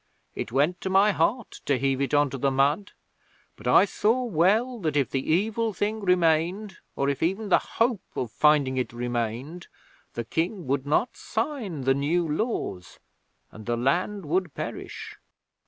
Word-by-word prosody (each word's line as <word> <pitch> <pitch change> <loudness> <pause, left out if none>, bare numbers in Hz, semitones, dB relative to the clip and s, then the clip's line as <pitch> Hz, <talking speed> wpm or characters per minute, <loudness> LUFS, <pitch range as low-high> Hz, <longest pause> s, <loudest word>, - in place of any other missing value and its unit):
It 110 - -5
went 150 +8 +1
to 190 - -3
my 195 +2 +5
heart 205 +7 -1
to 140 - +3
heave 135 +1 0
it 140 - 0
on 145 -2 +3
to 135 - -5
the 140 - +2
mud, 140 +9 +1 0.6
but - - -9
I - - +6
saw 225 +5 +1
well 225 +5 +2
that 155 -6 -1
if 140 - +1
the 135 +2 -1
evil 220 +5 +1
thing 210 +4 -1
remained, 180 +1 +1 0.2
or 140 - 0
if 140 -1 -1
even 195 +5 -1
the - - +5
hope 230 -3 0
of 120 -4 -3
finding 145 -3 +3
it 125 -2 -2
remained, 120 +7 -3 0.5
the 120 - -4
King 170 - -2
would 135 +1 -1
not 205 - +1
sign 225 - -3
the 135 +1 +3
New 160 +5 0
Laws, 150 - -3 0.5
and 110 +1 -12
the 120 0 0
land 175 - 0
would 170 0 -1
perish.' - - -6
160 Hz, 170 wpm, -26 LUFS, 135-205 Hz, 0.6 s, I